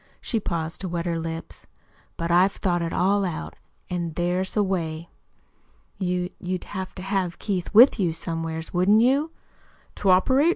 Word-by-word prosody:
She 230 - -1
paused 165 -4 -3
to 190 - -3
wet 170 0 -3
her 170 -1 -1
lips. 165 0 -6 0.5
"But 170 0 -2
I've 185 +3 +4
thought 175 -2 0
it 165 0 -2
all 200 +2 +2
out, 175 -4 -4 0.3
an' 175 -2 -3
there's 180 +4 -1
a 210 - +4
way." 170 -4 -3 0.9
"You 180 -1 -1
you'd 185 0 -3
have 190 -2 -6
to 185 - -7
have 190 -3 -1
Keith 185 -4 -3
with 235 +2 +7
you, 180 -4 +2
somewheres, 165 0 -4
wouldn't 195 +5 +4
you?" 275 +5 +3 0.7
"To 195 - +1
operate? 260 - +4
180 Hz, 165 wpm, -24 LUFS, 170-195 Hz, 0.9 s, with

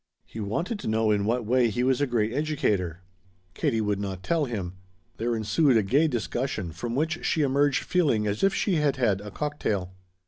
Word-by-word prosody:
He 115 - -9
wanted 170 - -2
to - - -6
know 110 0 +2
in 100 -1 +1
what 120 +1 0
way 120 +1 +3
he 120 +3 -1
was 130 +1 +2
a 145 - +2
great 115 -2 0
educator. 105 - -1 0.5
Katie 115 +4 0
would 105 -2 0
not 95 -2 -5
tell 165 -3 +1
him. 100 -8 -4 0.4
There 120 +1 -1
ensued 120 +4 +3
a 110 - +3
gay 140 +11 +3
discussion 120 - -2
from 115 +9 -4
which 155 +4 -1
she 155 - +1
emerged 140 0 +2
feeling 140 -12 +1
as 105 0 -2
if 195 - +5
she 195 -2 0
had 150 -3 +2
had 105 -6 +1
a 105 - -7
cocktail. 100 -8 -3
120 Hz, 200 wpm, -26 LUFS, 105-145 Hz, 0.5 s, if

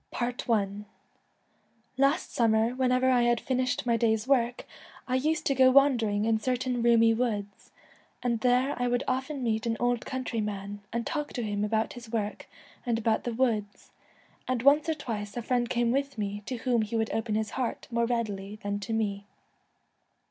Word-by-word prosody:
I 245 0 0 1.6
Last 275 +6 +1
summer, 225 -1 +3
whenever 255 0 +2
I 250 -1 +4
had 240 -1 +3
finished 255 0 -1
my 235 -1 +2
day's 220 0 +1
work, 245 -3 +1 0.4
I 255 - -2
used 305 +4 +1
to 275 - +2
go 260 -1 +6
wandering 240 -7 +3
in 225 -1 +2
certain 250 +1 -1
roomy 230 -1 +5
woods, 210 -4 -3 0.5
and 235 -2 0
there 250 +3 +2
I 245 - +2
would 245 +1 0
often 265 +1 -2
meet 225 -1 0
an 225 -1 0
old 245 -1 +1
countryman, 210 -6 -4
and 235 0 -2
talk 295 -2 -3
to 245 - -3
him 205 -1 -2
about 220 +1 0
his 235 -2 -11
work 210 -3 -3 0.4
and 235 -2 0
about 220 -1 0
the 240 - -2
woods, 220 -5 -1 0.6
and 255 -2 -1
once 290 +3 +5
or 320 - +1
twice 220 -7 -5
a 240 - -3
friend 240 0 0
came 240 -1 +1
with 275 0 -1
me 205 -1 -3
to 255 - -2
whom 240 -1 +1
he 215 +1 -3
would 220 -1 0
open 225 -1 -1
his 215 -1 -1
heart 255 -3 -3
more 235 0 +1
readily 210 -4 -2
than 205 0 -2
to 205 +3 -4
me. 200 -2 -2
235 Hz, 175 wpm, -28 LUFS, 220-255 Hz, 1.6 s, go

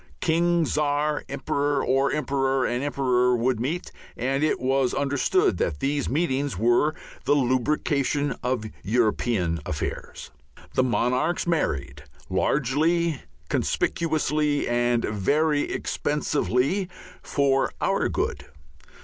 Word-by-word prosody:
King, 170 +1 +2
Czar 150 0 0
and - - -7
Emperor, 140 +1 -1
or 135 +1 +2
Emperor 135 -3 0
and 120 +2 -1
Emperor 125 -3 +2
would 120 0 0
meet, 155 +9 -3 0.3
and 135 +4 0
it 155 - +1
was 130 0 +1
understood 145 - +1
that 75 -4 -1
these 140 +1 -1
meetings 140 - 0
were 120 +8 +3 0.3
the 145 - +4
lubrication 140 +2 +1
of 125 -3 -1 0.2
European 105 -6 +1
affairs. 75 - -5 0.4
The - - +3
monarchs 125 +6 +1
married 75 - -1 0.3
largely, 150 - +1 0.3
conspicuously, 150 -2 0
and 120 0 +1
very 145 +9 +1
expensively 150 +4 0 0.3
for 135 -1 +1
our - - +1
good. - - -2
135 Hz, 105 wpm, -25 LUFS, 125-150 Hz, 0.4 s, the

